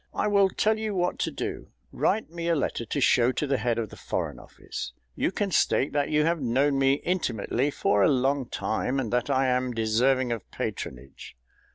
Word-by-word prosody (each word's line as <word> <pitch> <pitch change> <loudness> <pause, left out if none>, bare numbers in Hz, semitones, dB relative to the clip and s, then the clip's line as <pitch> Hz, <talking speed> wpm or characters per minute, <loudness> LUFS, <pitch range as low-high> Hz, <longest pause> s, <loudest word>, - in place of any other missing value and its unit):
"I - - 0
will 200 -2 +4
tell 215 +3 +1
you 215 -2 -2
what 180 -1 0
to - - -1
do. - - -5 0.2
Write 215 -7 0
me 170 0 -4
a 170 - +3
letter 130 -4 -2
to 145 - -2
show 125 -1 +4
to 150 - -1
the 135 -2 0
head 120 -2 0
of 115 -3 -2
the - - -11
Foreign - - -4
Office. - - -8 0.2
You - - 0
can 200 0 -2
state 140 -4 +2
that 145 -1 +1
you 150 0 +2
have 165 -1 +1
known 135 +3 +2
me 135 0 +4
intimately 140 - -1
for 105 -7 +1
a - - +5
long 135 0 +1
time, 125 +5 -1
and 120 -3 -3
that 125 +3 0
I 135 -1 +2
am 125 -1 +1
deserving 120 +3 +2
of 115 -4 -4
patronage. 65 0 -6
135 Hz, 205 wpm, -27 LUFS, 120-165 Hz, 0.2 s, a